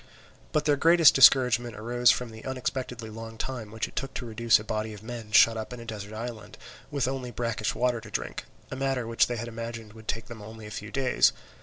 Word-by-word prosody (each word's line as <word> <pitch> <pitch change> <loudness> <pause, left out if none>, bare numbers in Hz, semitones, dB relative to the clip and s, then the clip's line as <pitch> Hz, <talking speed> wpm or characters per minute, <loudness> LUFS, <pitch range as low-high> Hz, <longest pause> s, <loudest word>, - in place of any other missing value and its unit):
But 150 -1 0
their 145 -1 +3
greatest 165 +1 +6
discouragement 125 -4 +5
arose 120 +3 +2
from 125 -2 +1
the 110 0 -11
unexpectedly 125 -3 -4
long 115 +1 -8
time 120 -3 -5
which 110 +1 -3
it - - -16
took 135 0 -4
to 125 - -4
reduce 115 0 +3
a - - -7
body 110 0 -3
of 105 - -13
men 115 -2 -7
shut 115 +1 +6
up 110 +1 -5
in 125 - -8
a 115 - -9
desert 105 -2 -7
island, 115 -1 -7 0.3
with 140 -3 -1
only 130 -2 -3
brackish 115 -2 -2
water 120 -1 0
to - - -11
drink, - - -4 0.3
a - - -3
matter 135 -2 -1
which 115 0 +2
they 120 - -3
had 115 +1 -5
imagined 115 -1 -7
would 110 -1 -14
take 115 +1 -2
them 115 -2 -10
only 110 +1 -10
a 105 - -9
few 105 0 -6
days. 135 -1 +3
115 Hz, 225 wpm, -27 LUFS, 110-125 Hz, 0.3 s, greatest